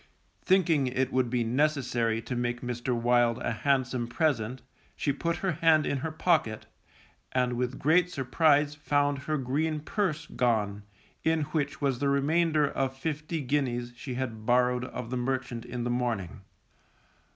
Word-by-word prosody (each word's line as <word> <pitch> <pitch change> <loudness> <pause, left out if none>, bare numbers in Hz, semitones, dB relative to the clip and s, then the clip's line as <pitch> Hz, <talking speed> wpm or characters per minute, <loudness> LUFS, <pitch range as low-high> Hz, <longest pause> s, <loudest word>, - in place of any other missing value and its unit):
Thinking 165 -7 +3
it 130 +1 -1
would 130 -2 +2
be 120 -1 +1
necessary 120 -3 0
to 120 +2 -4
make 120 0 -2
Mr. 120 0 -2
Wild 120 -1 +3
a 120 - -2
handsome 130 0 0
present, 125 -3 -1 0.3
she 145 - 0
put 170 +4 -1
her 190 - +2
hand 160 -1 +3
in 140 - 0
her 160 - -3
pocket, 155 -10 +1 0.7
and 125 -1 +1
with 125 +1 -2
great 170 +5 +3
surprise 145 0 +2
found 145 -1 0
her 155 +3 -2
green 150 +4 -1
purse 165 -2 -2
gone, 105 -7 0 0.4
in 160 0 +2
which 145 -2 -2
was 135 -3 0
the 140 0 +1
remainder 150 +2 +2
of 135 -1 -2
fifty 155 +2 -3
guineas 125 -3 -1
she 130 0 -6
had 120 -4 -4
borrowed 125 +1 +2
of 125 -2 -6
the 125 - -1
merchant 125 -1 -2
in 120 0 -4
the 120 - -1
morning. 115 -7 -2
130 Hz, 155 wpm, -28 LUFS, 120-150 Hz, 0.7 s, Thinking